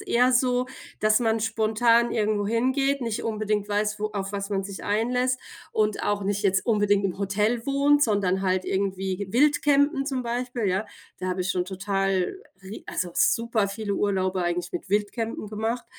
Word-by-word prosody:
eher 250 +2 +2
so, 250 0 +2 0.3
dass 215 +1 +4
man 225 -1 +1
spontan 230 +2 +2
irgendwo 210 -2 0
hingeht, 260 +5 +1
nicht 230 -3 -2
unbedingt 215 -2 -1
weiß, 210 +1 0
wo 215 - +1
auf 195 0 -4
was 200 0 -4
man 195 -1 -1
sich 200 -1 -7
einlässt, 250 +5 +1 0.3
und 215 -1 0
auch 205 -1 0
nicht 205 +1 -1
jetzt 195 +1 +1
unbedingt 205 -3 +2
im 190 0 -2
Hotel 210 +4 0
wohnt, 285 +1 +3
sondern 195 -4 +1
halt 185 -1 +1
irgendwie 190 0 -2
Wildcampen 285 +1 +3
zum 265 -3 -2
Beispiel, 240 0 -3
ja. 190 +3 0 0.3
Da 185 - -4
habe 185 0 -2
ich 180 - -1
schon 180 -1 0
total, 195 - -1 0.3
ri 195 +3 -9
also, 180 -1 -3
super 230 -3 +2
viele 200 0 -3
Urlaube 190 -2 0
eigentlich 175 0 -2
mit 175 - -5
Wildcampen 210 +2 -1
gemacht. 225 +3 -2
210 Hz, 170 wpm, -25 LUFS, 195-235 Hz, 0.3 s, dass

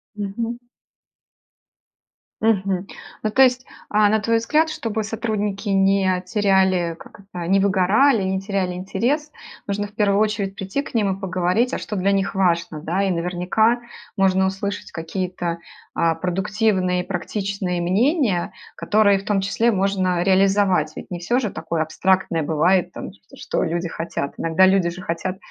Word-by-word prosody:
Мгм. 225 +4 -4 1.8
Мгм. 195 -3 +1 0.3
Ну, 215 - 0
то 265 - +6
есть, 255 0 +2 0.2
а, 210 0 +4
на 220 - +2
твой 230 +2 +1
взгляд, 305 +8 +2
чтобы 225 -6 -3
сотрудники 210 -1 -3
не 195 -1 +2
теряли- 190 -3 +2
как 225 - -14
это- 180 -4 -7
не 195 +1 +3
выгорали, 200 +5 +3
не 190 0 -1
теряли 195 -2 -2
интерес, 240 - -2 0.4
нужно 205 0 -2
в 205 - -20
первую 205 -2 +2
очередь 205 -2 0
прийти 195 +7 -3
к 280 - -11
ним 200 -4 +1
и - - -13
поговорить: 185 +6 0
а - - -1
что 210 - -5
для 195 +1 +1
них 195 0 0
важно, 170 -5 0
да? 180 +6 -1
И, 195 - +1
наверняка, 180 +7 +1 0.4
можно 190 -1 +3
услышать 200 +1 -4
какие-то, 175 0 -4 0.3
а, 165 -1 +1
продуктивные 185 +1 0
и - - -18
практичные 195 -1 -3
мнения, 205 - +1 0.2
которые 205 -2 +3
в 195 - -12
том 210 -2 +1
числе 225 +4 +1
можно 185 -3 +1
реализовать. 190 -4 +3
Ведь - - -9
не 175 - -4
всё 235 +9 0
же 220 -6 -2
такое 165 0 -2
абстрактное 185 +1 0
бывает 175 +4 +2
там - - -7
то, 195 - -19
что - - -2
люди 170 +1 -2
хотят. 165 -4 -4
Иногда 165 +3 +4
люди 190 -2 +3
же 180 +2 -8
хотят 185 +3 -3
195 Hz, 160 wpm, -21 LUFS, 180-210 Hz, 1.8 s, то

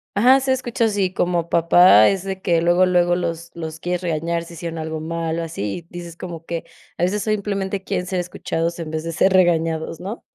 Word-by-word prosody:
ajá, 255 +6 +6
ser 265 0 +1
escuchados, 235 -4 -1
y 190 -2 0
como 175 -2 0
papá 170 - +6
es 195 -1 0
de 190 -1 -5
que 170 -2 +2
luego 175 +2 +4
luego 175 -1 +2
los 170 -1 -4
los 160 -1 -7
quieres 180 0 -2
regañar 170 0 -1
si 170 - -12
hicieron 170 0 -6
algo 160 0 -4
mal 165 0 -3
o - - -2
así, 130 - -4
y - - -13
dices 175 -1 -8
como 170 -2 -8
que 170 -1 -4 0.3
a 175 - -1
veces 200 +3 0
simplemente 200 -2 -2
quieren 180 -2 -2
ser 185 -1 -1
escuchados 170 -1 -3
en 160 -2 -5
vez 155 0 -3
de 165 - -4
ser 190 +2 +2
regañados, 165 -3 +1
¿no? 205 +6 -6
175 Hz, 215 wpm, -21 LUFS, 165-190 Hz, 0.3 s, ajá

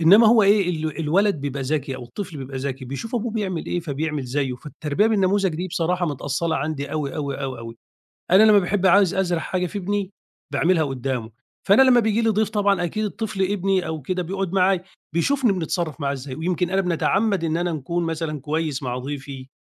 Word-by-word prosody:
إنما 200 +8 +7
هو 220 -1 +6
إيه 200 -2 +4
ال 160 -1 -3
الولد 190 +6 +2
بيبقى 140 -1 -3
ذكي 135 -1 -2
أو 130 - -8
الطفل 165 +7 -7
بيبقى 135 0 -6
ذكي، 130 0 -4
بيشوف 140 - -6
أبوه 235 -1 -1
بيعمل 190 -7 -2
إيه 175 - -1
فبيعمل 150 -2 -3
زيّه. 130 0 -1
فالتربية 150 - -1
بالنموذج 195 -4 +2
دي 180 +3 -3
بصراحة 175 +1 0
متأصلة 145 +3 -1
عندي 145 0 -3
أوي، 150 -3 -2
أوي، 140 -1 -3
أوي، 130 -2 -4
أوي. 115 0 -8 0.5
أنا 190 +4 +7
لمّا 215 -1 +7
باحب 195 0 +1
عاوز 195 -1 +5
أزرع 180 -3 0
حاجة 180 +2 -1
في 205 - -5
ابني 200 0 -2 0.4
باعملها 170 -1 +3
قدامه، 130 -4 -3 0.4
فأنا 205 +7 +7
لمّا 255 -2 +6
بييجي 220 0 +1
لي 225 - +2
ضيف 215 0 +1
طبعًا 200 -4 +1
أكيد 215 +5 -2
الطفل 210 -2 -3
ابني 190 -1 +1
أو 160 -2 -4
كده 180 +6 -2
بيقعد 190 +1 -3
معايا، 185 -1 +2 0.3
بيشوفني 245 +6 +2
بنتصرف 170 -3 -2
معاه 140 -1 0
إزاي، 135 -1 -6
ويمكن 175 +3 -1
أنا 195 +1 +2
بنتعمد 195 +2 +1
إن 160 0 0
أنا 175 0 -1
نكون 170 +4 -2
مثلًا 160 -3 -3
كويس 155 0 -2
مع 125 -1 -3
ضيفي، 135 -1 -7
170 Hz, 195 wpm, -23 LUFS, 145-195 Hz, 0.5 s, إنما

